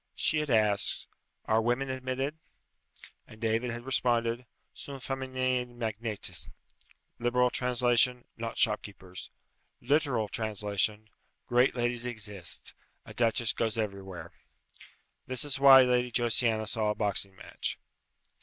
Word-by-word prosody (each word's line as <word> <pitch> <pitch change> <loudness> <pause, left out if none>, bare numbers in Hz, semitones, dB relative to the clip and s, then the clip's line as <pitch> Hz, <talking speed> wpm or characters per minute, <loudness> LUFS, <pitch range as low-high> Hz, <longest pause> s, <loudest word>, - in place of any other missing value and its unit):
She 155 - +2
had 150 -1 -2
asked, 105 -4 +2 0.4
"Are 110 +1 +3
women 120 +4 0
admitted?" 130 +4 -3 0.9
And 110 - -14
David 115 +2 0
had 120 +1 -6
responded, 120 -2 +1 0.3
"Sunt 135 -3 -8
fæminae 130 -1 -1
magnates!" 115 -3 -4 0.7
Liberal 125 +1 +2
translation, 125 0 +2
"Not 115 0 -5
shopkeepers." 100 -5 -1 0.5
Literal 140 -7 +1
translation, 105 0 -2 0.4
"Great 125 +2 +3
ladies 120 -1 0
exist. 105 -7 -3 0.3
A - - -10
duchess 115 -1 +2
goes 115 -1 -1
everywhere!" 100 -4 -5 1.0
This 130 +3 -1
is 140 -2 -1
why 135 -1 +9
Lady 125 -1 +1
Josiana 115 -2 +2
saw 110 0 0
a 105 - 0
boxing 100 -2 0
match. - - -5
120 Hz, 115 wpm, -30 LUFS, 110-125 Hz, 1.0 s, why